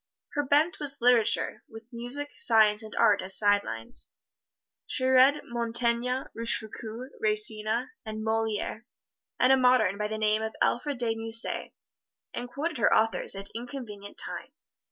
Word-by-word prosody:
Her 290 - -1
bent 290 +5 +2
was 280 -2 -3
literature, 240 -2 +2
with 225 0 -12
music, 250 +5 -2
science 215 -2 +4
and 215 -1 -9
art 205 -1 +4
as 190 +1 +4
side 205 -1 +4
lines. 115 0 -6 0.8
She 255 - -2
read 260 +3 +5
Montaigne, 235 +2 0
Rochefoucald, 230 +1 -3
Racine 250 - 0
and 215 -1 -6
Moliere, 220 +1 -2 0.5
and 255 +1 +5
a - - +5
modern 250 -6 +3
by 210 - -1
the 215 +1 -4
name 215 0 +1
of 220 0 -4
Alfred 270 +3 0
de 235 -2 -1
Musset, 225 +1 -1 0.6
and 245 0 -5
quoted 300 +2 -4
her - - +3
authors 220 -2 +2
at 195 +1 -2
inconvenient 230 -4 -8
times. - - -4
230 Hz, 145 wpm, -28 LUFS, 215-255 Hz, 0.8 s, read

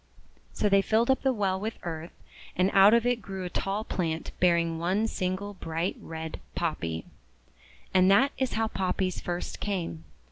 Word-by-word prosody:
So - - 0
they 200 -1 +5
filled 225 +5 +3
up 265 - +1
the 265 - +3
well 195 -5 0
with 220 +3 -4
earth, 165 -1 -5 0.5
and 185 +2 +2
out 200 +3 +8
of 235 0 +2
it 245 -1 +1
grew 190 0 -6
a 180 - -5
tall 200 +2 -1
plant 165 -6 -2
bearing 170 -2 +2
one 185 +6 +1
single 195 -1 -2
bright 165 -1 -2
red 160 -1 -6 0.2
Poppy. 85 - -2 0.9
And 185 0 +5
that 255 +8 +5
is 260 -2 0
how 225 0 +1
Poppies 185 -2 -1
first 175 0 -4
came. 170 - -3
190 Hz, 170 wpm, -28 LUFS, 170-210 Hz, 0.9 s, out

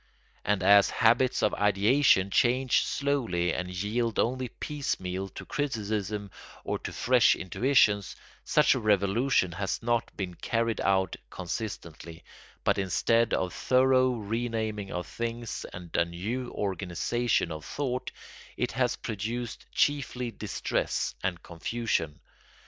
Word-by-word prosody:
And 105 0 0
as 100 0 +7
habits 120 +3 +3
of 105 - +3
ideation 105 0 +3
change 130 +2 +3
slowly 115 -12 0
and 90 0 -3
yield 105 +5 -1
only 130 +2 0
piecemeal 95 -12 -3
to - - -7
criticism 105 -7 -2 0.3
or - - -2
to - - -6
fresh 125 -1 +4
intuitions, 105 0 +2 0.3
such 150 - +4
a 130 - -1
revolution 105 0 +2
has 100 +5 -3
not 120 0 -1
been 95 -3 -3
carried 115 +4 -1
out 95 -2 +1
consistently, 85 -4 -6 0.4
but - - +2
instead 115 +5 +2
of 95 - -1
a - - -12
thorough 130 0 +3
renaming 110 -2 -3
of 90 -1 -3
things 115 +2 -4
and 90 -2 -9
a - - +4
new 110 +9 -4
organisation 95 +2 -1
of 80 -1 -6
thought 130 -3 -3 0.5
it 125 - -1
has 125 -1 +1
produced 115 +2 -5
chiefly 125 -4 0
distress 105 - -2
and 90 -3 -2
confusion. 85 -3 -2
110 Hz, 125 wpm, -28 LUFS, 95-125 Hz, 0.5 s, as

